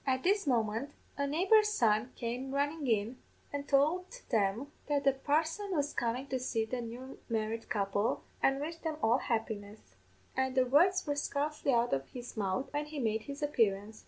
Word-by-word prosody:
"At 260 -1 0
this 395 -2 +2
moment 230 +2 0 0.2
a 280 0 -1
neighbour's 385 +9 +4
son 230 - +2
came 250 +3 -3
runnin' 290 +1 0
in, 225 +2 +1 0.4
an' 285 0 -3
tould 305 +7 +2 0.2
them 225 +4 +1 0.2
that 290 -1 +1
the 275 -1 +4
parson 315 +9 0
was 290 -1 0
comin' 240 +3 -1
to 260 - -1
see 230 -3 -1
the 245 +2 -3
new 245 +3 -8
married 225 0 -2
couple, 200 +1 0 0.2
an' 270 0 +3
wish 320 +3 -4
them 320 -2 -3
all 230 +4 +4
happiness; 210 - -4 0.4
an' 260 0 0
the 260 -1 +4
words 350 +9 +4
were 290 - 0
scarcely 290 0 -1
out 240 -1 +2
of 135 0 -1
his 245 -1 -8
mouth 205 +5 -2
when 295 +1 -1
he 300 0 -7
made 220 -4 0
his 280 +1 -6
appearance. 215 -7 +1
260 Hz, 180 wpm, -32 LUFS, 225-290 Hz, 0.4 s, neighbour's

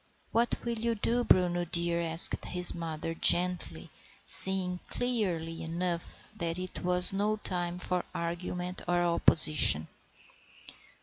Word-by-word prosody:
"What 235 +1 -1
will 235 -1 -4
you 230 +1 -3
do, 235 +3 -2
Bruno 175 -4 0
dear?" 170 0 -3
asked 165 0 +4
his 180 0 +2
mother 165 -1 -7
gently, 175 - 0 0.3
seeing 185 -2 +7
clearly 180 -11 -5
enough 170 +4 -7
that 170 -2 -5
it 185 0 -9
was 180 +1 +4
no 205 +2 -2
time 175 -3 -5
for 180 0 -3
argument 180 +1 -7
or 175 0 -1
opposition. 155 - +2
175 Hz, 120 wpm, -27 LUFS, 170-185 Hz, 0.3 s, seeing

